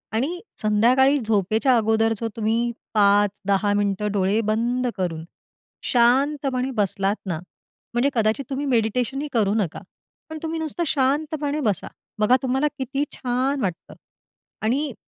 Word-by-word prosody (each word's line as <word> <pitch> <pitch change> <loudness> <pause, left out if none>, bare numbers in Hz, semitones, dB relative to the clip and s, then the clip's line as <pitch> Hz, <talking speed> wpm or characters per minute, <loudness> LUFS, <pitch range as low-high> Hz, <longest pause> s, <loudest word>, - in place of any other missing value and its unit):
आणि 315 +10 -1 0.2
संध्याकाळी 245 +7 +4
झोपेच्या 220 +4 +2
अगोदर 225 0 +2
जो 230 - -2
तुम्ही 230 +2 0 0.2
5-10 205 0 +2
मिनिटं 205 0 0
डोळे 200 +2 +1
बंद 245 +3 0
करून 165 -4 -2 0.7
शांतपणे 265 +1 +2
बसलात 200 -1 +1
ना, 170 -5 -3 0.5
म्हणजे 245 +4 +2
कदाचित 225 +3 +1
तुम्ही 275 +2 -2
मेडिटेशनही 250 +3 0
करू 210 -4 +2
नका. 195 -8 -1 0.5
पण 315 - -6
तुम्ही 325 0 -3
नुसतं 320 +2 -2
शांतपणे 290 +2 0
बसा. 210 - -1 0.3
बघा 215 +4 +5
तुम्हाला 265 +3 +1
किती 270 +2 -2
छान 260 +2 -1
वाटतं 180 -6 -4 0.7
आणि 265 +4 0
235 Hz, 125 wpm, -23 LUFS, 210-270 Hz, 0.7 s, बघा